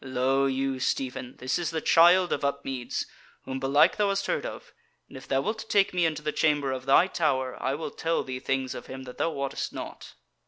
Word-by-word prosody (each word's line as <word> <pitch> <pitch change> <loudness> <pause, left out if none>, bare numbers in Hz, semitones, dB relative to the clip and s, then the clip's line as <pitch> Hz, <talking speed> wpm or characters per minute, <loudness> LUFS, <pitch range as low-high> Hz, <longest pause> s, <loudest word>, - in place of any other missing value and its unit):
Lo 135 +1 +1
you, 135 0 -1
Stephen, 130 -1 -2
this 130 +5 -1
is 175 - -1
the 160 - -2
Child 175 +3 +5
of - - -3
Upmeads, 135 -3 -2 0.4
whom 130 0 -4
belike 145 +6 +4
thou 205 -1 +2
hast 195 0 0
heard - - -1
of; - - -10 0.3
and - - -15
if - - -10
thou 135 0 +1
wilt 220 +5 -4
take 200 -2 +3
me 175 -2 +3
into 155 -2 -4
the 150 - -1
chamber 145 -4 +1
of 130 0 -5
thy 140 +6 +6
tower, 135 -8 0
I 135 +1 0
will 160 - -5
tell 165 0 -1
thee 130 -1 -5
things 130 0 -1
of - - -8
him 130 0 -7
that 125 -1 -11
thou - - +2
wottest 140 -4 -3
not." - - -8
135 Hz, 220 wpm, -27 LUFS, 130-165 Hz, 0.4 s, thy